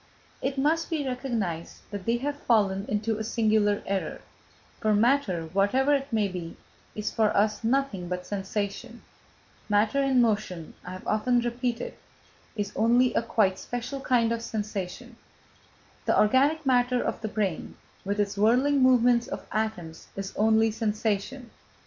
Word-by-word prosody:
It 270 +1 -2
must 315 +4 +1
be 310 -4 -1
recognised 230 -10 -3
that 200 -1 -6
they 235 +1 +2
have 285 +3 -4
fallen 200 -4 +2
into 215 +1 -1
a - - -2
singular 215 -2 +1
error; 195 -1 -3 0.6
for 215 -1 +2
matter, 215 -7 +2
whatever 255 +9 +3
it 275 -1 -1
may 215 -3 +2
be, 180 -3 -7 0.4
is 210 0 -3
for 220 -2 +2
us 210 +2 +1
nothing 230 -7 0
but 180 0 -4
sensation; 205 +4 -4 0.7
matter 210 +6 +2
in 270 -2 +3
motion, 210 -8 0
I 180 - -7
have 185 - -9
often 240 +3 +2
repeated, 240 0 -2 0.6
is 205 -1 -3
only 240 +2 +3
a - - +2
quite 205 -5 +1
special 245 +3 -5
kind 240 -4 +2
of 230 0 -1
sensation; 215 +1 -5 0.9
the - - +3
organic 280 +8 +3
matter 250 -1 +2
of - - -3
the 220 - -2
brain, 205 -6 -2 0.3
with 200 +2 -2
its 200 -1 0
whirling 260 +6 +3
movements 245 -2 +4
of - - -6
atoms, 185 -7 -3
is 195 0 -5
only 220 +1 +3
sensation. 220 +3 -2
220 Hz, 150 wpm, -27 LUFS, 205-250 Hz, 0.9 s, movements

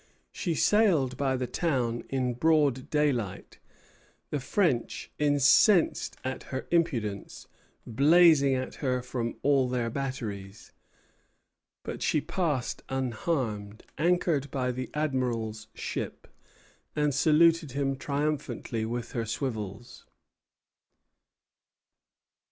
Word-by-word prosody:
She 170 -3 -2
sailed 165 - +3
by 135 0 0
the 130 0 -2
town 125 -5 -1
in 130 -2 0
broad 145 -1 +2
daylight, 125 -10 -1 0.7
the 150 - -1
French, 135 - -1
incensed 150 - +4
at 130 0 -4
her 130 0 -4
impudence, 125 -13 -1 0.4
blazing 140 +2 +5
at 130 0 -3
her 125 -3 0
from 120 -2 -3
all 135 -3 +3
their 120 -2 -1
batteries; 110 -7 -5 1.1
but - - -6
she 155 - +2
passed 150 -6 -2
unharmed, 120 -5 -2 0.2
anchored 165 -4 +1
by 130 -2 -1
the 125 -1 -5
Admiral's 120 -7 -2
ship, - - -5 0.7
and 150 -1 +1
saluted 160 +1 +4
him 135 0 0
triumphantly 140 -5 -2
with 120 +1 -4
her 115 -2 -3
swivels. 110 -2 -5
130 Hz, 100 wpm, -28 LUFS, 120-150 Hz, 1.1 s, blazing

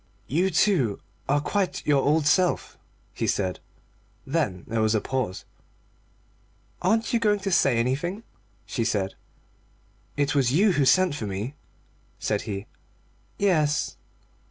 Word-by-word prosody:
"You, 175 - +1
too, 165 - +2 0.3
are 145 +1 +3
quite 190 +5 -1
your 145 -2 +3
old 150 +2 +2
self," 180 +3 +2 0.4
he - - -2
said. 95 -2 -1 0.7
Then 135 - -1
there 115 0 -1
was 110 0 +2
a - - +3
pause. 125 -6 -3 1.4
"Aren't 225 +3 +1
you 235 - +3
going 210 -2 +2
to 195 0 -2
say 135 -8 +3
anything?" 150 - -1 0.4
she 115 - -2
said. 100 -4 -1 1.0
"It 145 0 +1
was 135 -4 +2
you 200 +6 +4
who 145 -6 +2
sent 185 +3 +4
for 115 -7 -4
me," 100 +7 -4 0.6
said 105 -1 -1
he. 100 0 -4 0.7
"Yes." 155 -7 +1
145 Hz, 130 wpm, -25 LUFS, 115-185 Hz, 1.4 s, you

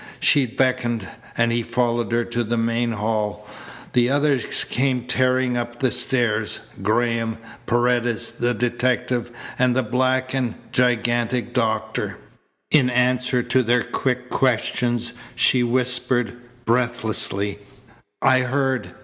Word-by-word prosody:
She 140 -3 +3
beckoned, 120 -4 0 0.3
and 115 0 +2
he 120 0 +1
followed 120 0 -1
her 120 0 +2
to 120 0 -2
the 115 +1 -2
main 115 +1 0
hall. 105 -1 -2 0.5
The 120 0 +3
others 140 -3 +1
came 130 0 0
tearing 130 0 +1
up 120 0 -3
the 130 0 +1
stairs 115 -5 0 0.2
Graham, 115 +2 0 0.3
Paredes, 120 -1 +1
the 120 0 -1
detective, 125 +1 0 0.3
and 125 -1 +3
the 130 - +2
black 130 +2 0
and 125 -4 -1 0.2
gigantic 120 -1 +1
doctor. 110 -3 -1 0.5
In 135 -5 +4
answer 125 0 +1
to 125 +2 +2
their 120 0 +2
quick 125 -1 -2
questions 120 -1 0 0.2
she 125 - +4
whispered 125 0 +1 0.3
breathlessly: 110 -4 0 0.6
"I 130 -1 +5
heard. 130 0 -1
120 Hz, 120 wpm, -22 LUFS, 115-125 Hz, 0.6 s, I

